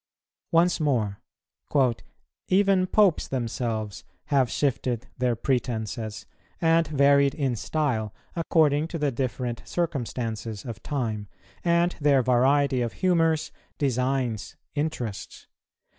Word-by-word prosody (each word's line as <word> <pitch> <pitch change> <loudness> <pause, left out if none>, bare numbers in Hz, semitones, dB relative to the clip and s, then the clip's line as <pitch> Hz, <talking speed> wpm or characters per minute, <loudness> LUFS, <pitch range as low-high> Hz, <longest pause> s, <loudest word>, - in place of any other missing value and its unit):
Once 175 +1 +3
more: 115 -10 0 1.3
"Even 190 -1 +3
Popes 200 -4 +3
themselves 115 -4 -3 0.3
have 130 -3 +4
shifted 125 -3 -1
their 125 -1 +2
pretences, 115 -3 -2 0.3
and 165 -1 +3
varied 140 -1 +4
in 135 -5 0
style, 115 -4 -1 0.2
according 155 -3 +2
to 165 - -5
the 150 -3 0
different 125 -1 -3
circumstances 115 - -3
of 115 -2 -7
time, 110 -8 -3 0.4
and 170 0 +2
their 140 -3 +4
variety 130 +2 +3
of 120 -1 -2
humours, 165 -4 +1 0.3
designs, 130 -4 -1 0.2
interests. 145 -9 -4
135 Hz, 100 wpm, -26 LUFS, 115-155 Hz, 1.3 s, have